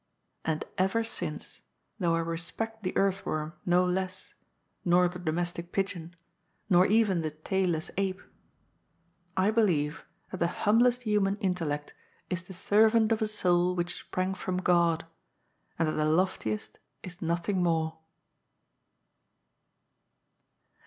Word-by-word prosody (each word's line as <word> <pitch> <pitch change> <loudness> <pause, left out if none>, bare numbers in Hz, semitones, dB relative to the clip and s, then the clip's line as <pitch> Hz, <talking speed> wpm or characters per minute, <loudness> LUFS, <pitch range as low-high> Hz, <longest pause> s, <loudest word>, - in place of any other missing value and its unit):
And 155 -1 -1
ever 195 +5 +2
since, 225 - -6 0.4
though 170 -3 +2
I 165 - +1
respect 180 +7 -4
the 185 - -2
earthworm 170 -5 0
no 180 +1 +4
less, 185 +1 -3 0.5
nor 180 0 +4
the 180 +1 -6
domestic 175 +1 -3
pigeon, 175 -3 -3 0.6
nor 180 +1 +6
even 205 -4 +3
the 155 - -1
tailless 165 +1 -1
ape, 195 -1 0 1.2
I 190 +3 +3
'Wieve 165 -10 +1 0.3
that 190 - -4
the 170 - +2 0.2
humblest 240 +4 +4
human 205 -3 +1
intellect 165 -7 -2 0.4
is 180 0 -1
the 185 +1 -11
servant 220 +4 +4
of 225 - +2
a 220 - +2
soul 180 -3 +2
which 175 0 -1
sprang 185 +1 -2
from 185 -1 -3
God, 170 -3 +2 0.7
and 165 - +1
that - - +1
the 155 0 0
loftiest 155 - 0 0.2
is 180 -1 -8
noth 170 0 -1
ing 190 -3 +1
more. 160 -2 0
180 Hz, 125 wpm, -29 LUFS, 165-195 Hz, 1.2 s, nor